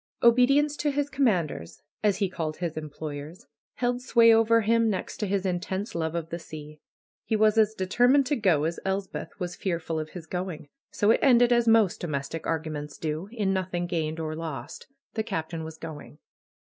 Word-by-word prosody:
Obedience 275 +5 +5
to 295 - 0
his 290 0 -1
commanders, 185 - 0 0.2
as 205 -3 +3
he 200 - +1
called 160 -4 -4
his 170 -3 -3
employers, 155 +4 -7 0.3
held 245 0 -1
sway 230 -2 +6
over 225 +1 +4
him 230 +1 +3
next 190 -3 -3
to 210 - -2
his 195 0 -1
intense 190 +3 -2
love 160 -1 -2
of 165 -1 -3
the 170 - -3
sea. 150 -2 -10 0.4
He 220 - -1
was 215 0 +4
as 220 -1 +3
determined 245 +9 +3
to 290 +3 +1
go 185 - +2
as 165 +2 -1
Elspeth 195 +1 -4
was 180 -2 -4
fearful 165 -3 -2
of 155 0 -5
his 170 0 -9
going. 180 -3 -5 0.2
So 205 +1 +2
it - - +3
ended 245 -2 +5
as 235 -1 +2
most 225 -4 +4
domestic 155 0 -4
arguments 155 -2 -3
do; 160 +4 -3
in 205 -5 0
nothing 180 -2 -2
gained 160 -2 -2
or 155 -1 -3
lost. 160 -3 -6 0.3
The 220 - -1
Captain 165 -6 -4
was 160 0 -8
going. 155 -2 -9
185 Hz, 185 wpm, -27 LUFS, 160-225 Hz, 0.4 s, sway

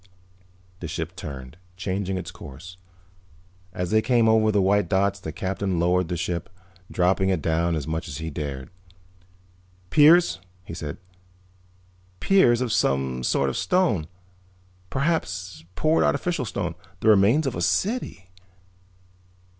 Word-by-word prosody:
The 85 - -5
ship 85 +1 -5
turned, 65 -2 -8 0.2
changing 95 +1 -2
its 90 - -6
course. 85 +7 -11 0.9
As 90 +1 -4
they 110 0 +4
came 120 -1 +3
over 110 -1 +4
the 105 - +2
white 100 -1 +2
dots 100 +1 +1
the 80 - -6
Captain 95 0 -2
lowered 90 +1 +2
the 90 0 -3
ship, 85 0 -3 0.4
dropping 95 +1 +2
it 95 -3 +1
down 80 +2 0
as 75 -4 -3
much 80 +2 -3
as 70 - -6
he 80 +1 -5
dared. 70 -2 -5 1.2
"Piers," 160 - +6 0.3
he - - -8
said. 75 -4 -6 1.2
"Piers 125 -12 +4
of 125 -3 -1
some 65 -2 0
sort 70 +2 +1
of 65 - -2
stone. 170 - +1 0.8
Perhaps 90 - -2
poured 155 +1 +2
artificial 170 -7 0
stone. 85 -5 -3 0.3
The - - 0
remains 110 +9 +5
of 135 - -1
a 85 - -4
city." 95 - -1
90 Hz, 135 wpm, -24 LUFS, 80-110 Hz, 1.2 s, Piers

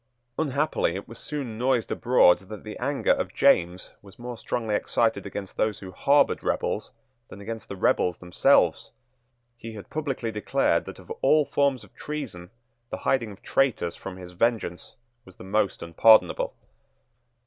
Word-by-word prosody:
Unhappily 150 -4 0
it 100 - -6
was 115 0 -10
soon 130 -7 -5
noised 125 -2 +1
abroad 120 -7 +4
that 105 -2 -8
the - - -7
anger - - 0
of - - -1
James 90 +1 +2
was 100 -2 -16
more 120 0 -6
strongly 115 -1 -3
excited 115 +2 0
against 100 -2 -7
those 110 -2 0
who 95 -2 -9
harboured 140 +9 +3
rebels - - -2 0.4
than 100 - -11
against 110 +2 -7
the 100 - -5
rebels 90 -2 +1
themselves. 90 0 +2 0.6
He 115 -1 -8
had 105 - -11
publicly 135 -7 -3
declared 105 -1 +1
that - - -9
of - - -13
all 150 +2 +4
forms 140 -5 +1
of 100 - -18
treason 130 -13 -6 0.4
the - - -4
hiding 115 -5 +1
of 100 - -14
traitors 115 -11 +1
from 95 -1 -8
his 90 -1 -10
vengeance 100 -2 -1 0.3
was 95 -4 -16
the - - -12
most 100 -1 0
unpardonable. 110 +7 +4
110 Hz, 160 wpm, -26 LUFS, 95-130 Hz, 0.6 s, abroad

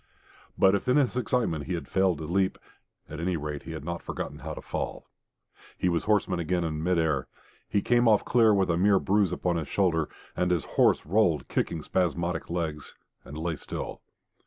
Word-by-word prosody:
But 95 0 +5
if 100 - -1
in 125 +3 +4
his 135 -4 +2
excitement 115 - 0
he 90 - -2
had 85 - -6
failed 95 -3 +2
to 80 - -6
leap, 95 +4 0 0.5
at 75 - -7
any 85 +1 0
rate 75 -1 -4
he 80 - -8
had 80 -2 -7
not 85 0 -4
forgotten - - -5
how - - -6
to - - -7
fall. - - -4 0.7
He 90 - +1
was 85 -1 0
horseman 100 -4 +1
again 85 +1 0
in 80 -2 -2
mid 90 +2 +1
air. 80 -5 +1 0.4
He 100 - +1
came 120 0 +3
off 105 -2 +4
clear 115 -3 +5
with 95 -3 +2
a 85 - +1
mere 100 +2 +4
bruise 100 0 +2
upon 90 -2 0
his 80 -4 -3
shoulder, 80 -6 +1 0.3
and 90 - +1
his 90 -3 +1
horse - - +2
rolled, 85 -2 +2
kicking 80 -2 -1
spasmodic 85 -1 -1
legs, 80 -3 -4 0.3
and 75 - -9
lay 80 +1 -2
still. - - -6
90 Hz, 200 wpm, -27 LUFS, 80-100 Hz, 0.7 s, But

